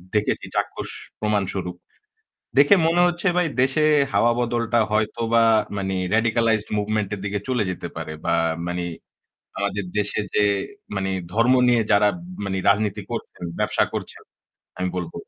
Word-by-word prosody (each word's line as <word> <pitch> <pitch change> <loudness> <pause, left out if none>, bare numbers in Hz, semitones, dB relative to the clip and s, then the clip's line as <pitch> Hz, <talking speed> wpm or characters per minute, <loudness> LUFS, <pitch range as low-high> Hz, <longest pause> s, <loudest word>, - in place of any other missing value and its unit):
দেখেছি 105 - 0
চাক্ষুষ - - -2 0.3
প্রমাণ 105 -2 +1
স্বরূপ। 90 -2 -4 0.8
দেখে 145 +7 +7
মনে 170 +2 +3
হচ্ছে 175 +2 -2
ভাই 180 -1 +3
দেশে 135 +4 +2 0.3
হাওয়া 120 0 +4
বদলটা 120 -1 0
হয়তোবা 115 +2 +1 0.3
মানে 95 -1 -2 0.2
radicalized 115 -1 +2
movement 105 0 -1
এর 100 - -7
দিকে 100 0 -1
চলে 125 -4 +1
যেতে 90 - -5
পারে 80 - -5
বা - - +1 0.3
মানে 90 0 -2 0.7
আমাদের 100 0 -1
দেশে 105 0 0
যে 105 - +4 0.5
মানে 95 0 -1 0.2
ধর্ম 115 +5 +4
নিয়ে 120 -2 +4
যারা 105 0 +5 0.4
মানে 95 -1 -2
রাজনীতি 105 0 +2
করছেন, - - -6 0.2
ব্যবসা - - +2
করছেন - - -6 0.6
আমি 90 0 0
বলব। 85 -2 -4
105 Hz, 140 wpm, -23 LUFS, 100-120 Hz, 0.8 s, দেখে